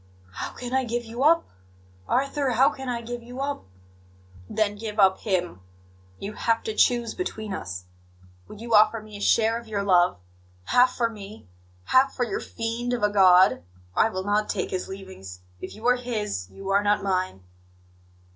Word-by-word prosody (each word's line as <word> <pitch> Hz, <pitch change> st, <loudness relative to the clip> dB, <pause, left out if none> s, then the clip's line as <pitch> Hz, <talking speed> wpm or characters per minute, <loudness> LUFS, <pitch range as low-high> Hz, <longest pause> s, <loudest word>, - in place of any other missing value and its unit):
"How -, -, -5 dB
can 250 Hz, 0 st, -7 dB
I 265 Hz, 0 st, +2 dB
give 240 Hz, 0 st, -3 dB
you 230 Hz, +3 st, -6 dB
up? 330 Hz, +4 st, +4 dB, 0.6 s
Arthur, 275 Hz, 0 st, 0 dB
how 265 Hz, +5 st, +4 dB
can 265 Hz, -2 st, -7 dB
I 235 Hz, -1 st, -2 dB
give 240 Hz, +1 st, -6 dB
you 245 Hz, +2 st, -10 dB
up?" 280 Hz, +1 st, -3 dB, 0.8 s
"Then 210 Hz, -1 st, 0 dB
give 215 Hz, 0 st, -6 dB
up 190 Hz, -1 st, +5 dB
Him. 180 Hz, -, -2 dB, 0.6 s
You 205 Hz, +2 st, -6 dB
have 230 Hz, +1 st, 0 dB
to 220 Hz, -, -3 dB
choose 235 Hz, +1 st, +2 dB
between 220 Hz, -, -4 dB
us. 90 Hz, -, -6 dB, 0.6 s
Would 210 Hz, -, -11 dB
you 235 Hz, 0 st, -4 dB
offer 215 Hz, +1 st, +5 dB
me 215 Hz, -1 st, -12 dB
a 205 Hz, -, -8 dB
share 225 Hz, +2 st, +3 dB
of 235 Hz, -, -14 dB
your 205 Hz, -2 st, -2 dB
love 180 Hz, -, +3 dB, 0.5 s
half 250 Hz, -, +3 dB
for 235 Hz, -, +1 dB
me, 210 Hz, 0 st, -11 dB, 0.4 s
half 260 Hz, -, +3 dB
for 250 Hz, -, 0 dB
your 230 Hz, -, -3 dB
fiend 230 Hz, +2 st, -3 dB
of 240 Hz, -, -2 dB
a 210 Hz, -, +3 dB
God? 185 Hz, -, +6 dB, 0.3 s
I 225 Hz, -, +4 dB
will 185 Hz, -3 st, -4 dB
not 205 Hz, +1 st, 0 dB
take -, -, -2 dB
His 185 Hz, -1 st, -3 dB
leavings. 190 Hz, -, -9 dB, 0.2 s
If -, -, -7 dB
you 220 Hz, +2 st, -11 dB
are 250 Hz, 0 st, +4 dB
His, 210 Hz, -, -3 dB
you 195 Hz, 0 st, -8 dB
are 200 Hz, +1 st, +3 dB
not 205 Hz, 0 st, +1 dB
mine." 185 Hz, -, -1 dB
215 Hz, 185 wpm, -25 LUFS, 195-240 Hz, 0.8 s, God